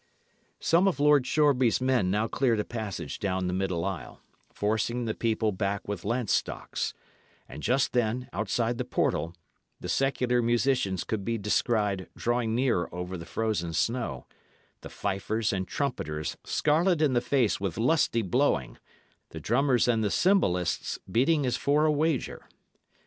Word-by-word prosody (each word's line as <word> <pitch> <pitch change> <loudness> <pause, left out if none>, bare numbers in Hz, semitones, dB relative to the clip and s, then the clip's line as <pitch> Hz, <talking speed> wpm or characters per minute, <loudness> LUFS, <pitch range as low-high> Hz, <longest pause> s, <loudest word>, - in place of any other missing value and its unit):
Some 170 +4 +3
of 175 -8 0
Lord 145 -3 +4
Shoreby's 135 -6 +3
men 130 -7 +1
now 105 +4 +1
cleared 120 -2 +1
a - - +1
passage 100 -9 -5
down 95 -3 -1
the 90 - -1
middle 95 -2 -1
aisle, 95 -3 -5 0.3
forcing 110 +3 -1
the 110 - -1
people 110 -1 0
back 100 0 -2
with 100 -4 -4
lance 120 -2 0
stocks; - - -2 0.5
and 75 - -9
just 130 - +1
then, 125 +1 0
outside 115 +3 -1
the - - 0
portal, 80 +3 -1 0.4
the - - -7
secular 125 +4 +1
musicians 120 -5 +1
could 110 -3 -3
be 115 +2 -1
descried 105 -3 0
drawing 120 -1 0
near 120 -8 +1
over 90 +1 -5
the 85 -2 -8
frozen 105 -7 -2
snow, 115 - -1 0.6
the - - -9
fifers 105 +3 -2
and 95 -1 -2
trumpeters 75 - -3
scarlet 165 +3 +2
in 150 -4 +2
the 120 - +2
face 125 -7 +1
with 95 -4 -2
lusty 120 -2 +2
blowing, 95 - 0 0.5
the 80 - -8
drummers 125 - +2
and 115 -2 +2
the 105 - +1
cymbalists 95 - +1
beating 140 - +3
as 125 -1 0
for 145 +4 +2
a 155 - +4
wager. 150 -2 -1
115 Hz, 155 wpm, -28 LUFS, 95-130 Hz, 0.6 s, Lord